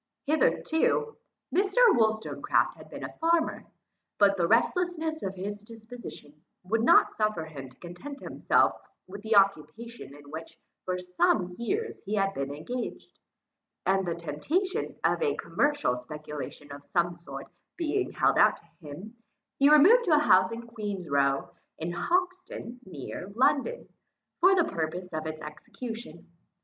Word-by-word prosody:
Hitherto 320 +8 +1 0.4
Mr. 390 +4 +1
Wollstonecraft 220 - +1
had - - -14
been - - -8
a - - -6
farmer; 330 0 +1 0.5
but 200 -1 +5
the 175 -3 +1
restlessness 320 - +1
of 195 0 -4
his 205 +2 -5
disposition 220 -9 -11 0.2
would 220 +5 0
not 235 - +6
suffer 215 -7 0
him 140 -4 -9
to 130 - -21
content 215 +12 -9
himself - - +1 0.2
with 200 +2 -9
the 220 +1 0
occupation 200 - +1
in 145 0 -14
which 160 +1 -8 0.3
for 185 0 -1
some 180 0 +1
years 425 - -2
he 205 +2 -2
had 195 -1 +1
been 140 -3 -3
engaged, 235 - -6 0.7
and 195 0 +2
the 170 - -1
temptation 290 - -2
of - - +2
a 450 -2 +1
commercial 290 - 0
speculation 150 +1 -8
of 140 0 -9
some 175 0 0
sort 170 0 -9 0.3
being 350 +3 0
held - - +2
out - - +5
to - - -20
him, 175 +8 -10 0.4
he 280 +1 +6
removed 370 +12 +7
to 330 -5 +5
a - - +5
house 190 -10 +5
in 235 +1 -6
Queen's 205 -6 -5
Row, 140 -1 +1 0.3
in 165 +2 -3
Hoxton 360 - -2
near 180 +3 -7
London, 285 - +1 0.5
for 380 +1 +6
the 350 - +4
purpose 170 - -4
of 155 0 -3
its 155 0 -6
execution. 195 +4 -8
205 Hz, 145 wpm, -28 LUFS, -, 0.7 s, removed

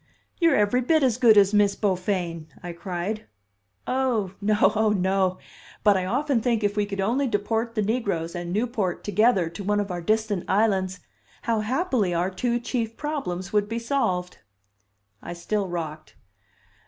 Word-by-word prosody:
"You're 335 -5 +4
every 210 +3 +2
bit 310 +4 +2
as 250 -2 +2
good 230 -4 +6
as 200 0 +5
Miss 205 -1 +3
Beaufain," 180 -5 -1 0.2
I 175 -1 -5
cried. 185 +4 -4 0.6
"Oh, 245 -7 0
no; 210 +1 +3
oh, 220 0 +3
no! 190 -2 +1 0.5
But 205 -2 +5
I 185 -1 0
often 260 +4 0
think 230 -2 0
if 205 0 +1
we 205 -1 0
could 200 -1 -5
only 245 +8 +1
deport 225 +2 -1
the 215 - +1
negroes 200 -7 -1
and 175 -1 -5
Newport 210 -3 -1
together 205 -3 +3
to 200 - -7
one 205 +1 +1
of 205 -2 -2
our 175 -1 -4
distant 215 0 0
islands, 190 -3 +1 0.4
how 230 -2 +1
happily 230 - 0
our 175 +3 0
two 240 +5 -1
chief 230 -2 -3
problems 195 - -4
would 210 0 +2
be 230 - -2
solved!" 210 -8 -1 0.8
I 175 - -6
still 195 +4 -2
rocked. 160 -3 -6
205 Hz, 165 wpm, -25 LUFS, 185-230 Hz, 0.8 s, good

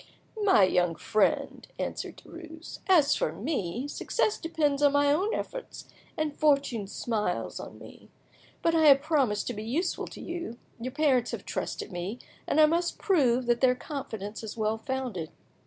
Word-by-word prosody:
"My 390 - +5
young 180 -2 +2
friend," 215 +6 0
answered - - -4
Derues, 330 -1 -10
"as 310 -6 +5
for - - 0
me, 245 - -3
success 415 +7 -1
depends 300 -4 0
on 285 -1 +5
my 285 0 +4
own 385 +8 +1
efforts, - - -6 0.3
and 310 -2 -1
fortune 275 -8 +2
smiles 210 -3 -2
on - - -9
me. - - -14 0.5
But 330 - +3
I 320 -2 +5
have 275 -1 +7
promised 275 -10 +1
to 245 - -3
be 210 - -6
useful 320 +11 -1
to - - -10
you, 340 -9 -5 0.2
your 245 +2 -3
parents 265 -4 +2
have - - -5
trusted - - -4
me, 180 +6 -4 0.3
and 310 - +2
I 310 - +9
must 340 +3 0
prove 260 -10 +2
that 240 0 +1
their 255 -1 +5
confidence 225 -8 -6
is 220 +1 -6
well 220 0 0
founded. 240 -10 -3
275 Hz, 165 wpm, -28 LUFS, 220-315 Hz, 0.5 s, I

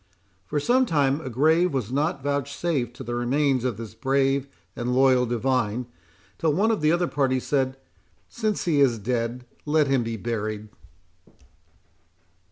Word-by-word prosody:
For 150 - -1
some 250 - +2
time 145 -3 +1
a 130 - -5
grave 160 +6 +2
was 125 -3 -2
not 145 +2 -1
vouchsafed 140 -2 -2
to - - -8
the 120 - -5
remains 130 +2 +1
of 125 -5 -1
this 115 -2 -8
brave 135 +3 +1 0.3
and 125 +1 -2
loyal 130 -1 +4
divine, 120 -1 0 0.5
till 160 -3 +2
one 210 +8 +2
of 220 - -1
the 155 0 +3
other 175 +1 +2
party 135 -4 +1
said, 130 0 -1 0.5
"Since 215 -3 -2
he 155 -5 +2
is 125 -4 +4
dead, 120 +2 -2 0.2
let 150 0 +2
him 135 -2 +2
be 115 -1 -3
buried." 110 -1 -4
135 Hz, 155 wpm, -25 LUFS, 120-150 Hz, 0.5 s, loyal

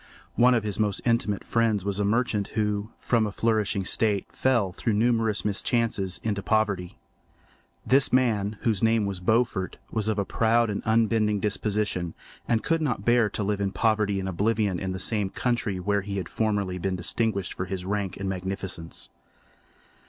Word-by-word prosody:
One 125 +1 +5
of 115 - +1
his 105 -1 -3
most 105 -2 +1
intimate 115 -4 +1
friends 110 -4 +1
was 100 0 -1
a - - +2
merchant 105 -1 +1
who, 105 0 0
from 115 -3 +1
a - - -4
flourishing 105 -1 0
state, 105 0 0
fell, 120 -8 +1
through 110 +4 -1
numerous 115 -1 +1
mischances, 105 -3 0
into 105 -2 -1
poverty. 100 -5 0 0.9
This 135 +1 +3
man, 110 -5 +1
whose 110 -5 0
name 115 -1 +3
was 100 -2 -3
Beaufort, 110 0 0
was 110 -2 -1
of 110 - 0
a 100 - 0
proud 115 +1 +2
and 100 - -3
unbending 110 -2 +2
disposition 105 -4 -1 0.3
and 115 -1 +1
could 165 0 +1
not 125 -9 -1
bear 120 -2 +4
to 105 - -3
live 100 0 -1
in 100 -1 0
poverty 105 -3 +1
and 95 - -3
oblivion 100 0 0
in 95 -1 -3
the 95 - -3
same 100 0 0
country 120 -4 -1
where 100 +2 0
he 100 0 -5
had 95 - -3
formerly 100 -4 -1
been 95 +1 -1
distinguished 100 0 -1
for 90 - -4
his 90 -1 -5
rank 100 -1 -2
and 95 - -4
magnificence. 95 -3 -4
105 Hz, 175 wpm, -26 LUFS, 95-115 Hz, 0.9 s, One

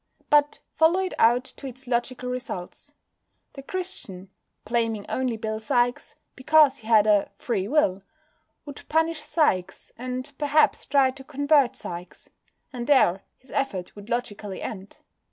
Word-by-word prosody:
But 295 0 +3
follow 325 +3 +4
it 375 - -3
out 240 +2 +4
to 275 - -7
its 260 +1 -10
logical 250 +1 -2
results. 245 -8 -6 0.6
The 275 - -9
Christian, 240 - -7 0.3
blaming 225 -2 -1
only 255 -3 -1
Bill 220 -1 -3
Sikes, 245 +1 0 0.2
because 285 0 +4
he 220 - -13
had 220 -2 +5
a 210 -2 +3
"free 200 -5 -2
will," 210 -9 +2 0.6
would 285 -1 -9
punish 320 0 +1
Sikes, 300 - 0
and 255 +2 -5
perhaps 295 +1 +2
try 270 -1 +4
to 265 +1 -12
convert 285 -1 +2
Sikes; 175 +1 -9 0.4
and 240 -1 -5
there 200 -10 +4 0.2
his 260 - -20
effort 200 -10 -3
would 205 +1 -12
logically 215 -5 -3
end. 195 -2 -7
250 Hz, 140 wpm, -25 LUFS, 215-285 Hz, 0.6 s, had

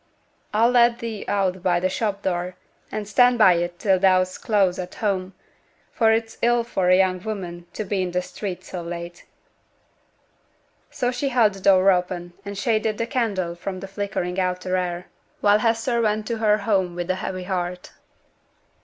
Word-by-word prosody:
I'll 230 +3 +3
let 240 -1 +4
thee 230 -4 -6
out 190 -2 0
by 175 -1 +2
t' 185 - +1
shop 200 +1 -2
door, 180 0 -2 0.4
and 210 -1 -4
stand 245 +4 +4
by 190 -5 +7
it 175 0 -3
till 190 -1 +2
thou's 185 -1 +2
close 195 -5 +1
at 180 0 -6
home, 190 -3 -2 0.6
for 225 -2 +3
it's 225 0 -1
ill 240 0 +3
for 190 -6 0
a 185 - +6
young 185 -1 +2
woman 175 -5 -6
to 215 - -3
be 195 -2 -1
i' 180 - -2
t' 180 +1 -1
street 185 0 -6
so 180 - -6
late.' 170 0 -7 1.6
So 245 0 -1
she 255 +3 -2
held 235 -5 +3
the 195 - -10
door 195 0 +5
open, 180 -1 -2
and 200 0 -7
shaded 215 0 0
the 230 - -1
candle 210 -9 -1
from 185 +2 -6
the 195 - -7
flickering 195 -2 -3
outer 185 0 -1
air, 180 -1 -2 0.3
while 205 0 +4
Hester 230 +2 +1
went 215 -1 0
to 230 -1 -2
her 210 -1 +3
home 195 -4 0
with 175 +1 -2
a - - 0
heavy 185 -1 -4
heart. 180 -1 -4
195 Hz, 180 wpm, -23 LUFS, 180-220 Hz, 1.6 s, by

